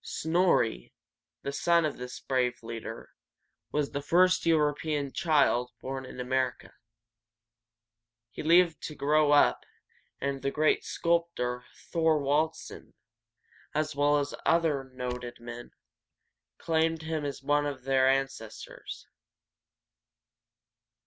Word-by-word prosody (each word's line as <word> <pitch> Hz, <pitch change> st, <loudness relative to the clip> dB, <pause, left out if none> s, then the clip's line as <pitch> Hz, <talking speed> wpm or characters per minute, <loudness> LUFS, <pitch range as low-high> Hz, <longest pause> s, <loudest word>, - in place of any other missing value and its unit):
Snor´ri, 160 Hz, -, +1 dB, 0.5 s
the 140 Hz, -, -2 dB
son 170 Hz, +3 st, +2 dB
of 150 Hz, -, -3 dB
this 125 Hz, 0 st, -7 dB
brave 125 Hz, -2 st, -1 dB
leader, 115 Hz, 0 st, -7 dB, 0.6 s
was 145 Hz, -1 st, -1 dB
the 140 Hz, -, -3 dB
first 180 Hz, +4 st, +3 dB
European 150 Hz, -2 st, +1 dB
child 140 Hz, -6 st, +2 dB
born 130 Hz, 0 st, -5 dB
in -, -, -10 dB
America. 130 Hz, 0 st, -2 dB, 1.6 s
He -, -, -7 dB
lived 170 Hz, 0 st, +4 dB
to 150 Hz, -, -9 dB
grow 150 Hz, +1 st, +3 dB
up, 145 Hz, -, +4 dB, 0.6 s
and 140 Hz, -1 st, -2 dB
the 140 Hz, -, 0 dB
great 155 Hz, +2 st, +2 dB
sculptor 170 Hz, -8 st, -1 dB, 0.3 s
Thor´wald 155 Hz, -1 st, +2 dB
sen, -, -, -12 dB, 0.8 s
as 155 Hz, 0 st, -1 dB
well 145 Hz, +1 st, +3 dB
as 145 Hz, 0 st, -1 dB
several -, -, -10 dB
other 160 Hz, -5 st, +2 dB
noted 125 Hz, -1 st, -5 dB
men, 120 Hz, 0 st, -8 dB, 0.9 s
claimed 160 Hz, 0 st, 0 dB
him 160 Hz, -1 st, -3 dB
as 140 Hz, -1 st, -5 dB
one 145 Hz, +1 st, +2 dB
of 135 Hz, -3 st, -6 dB
their 130 Hz, 0 st, +3 dB
ancestors. 135 Hz, -5 st, -4 dB
145 Hz, 115 wpm, -29 LUFS, 130-160 Hz, 1.6 s, lived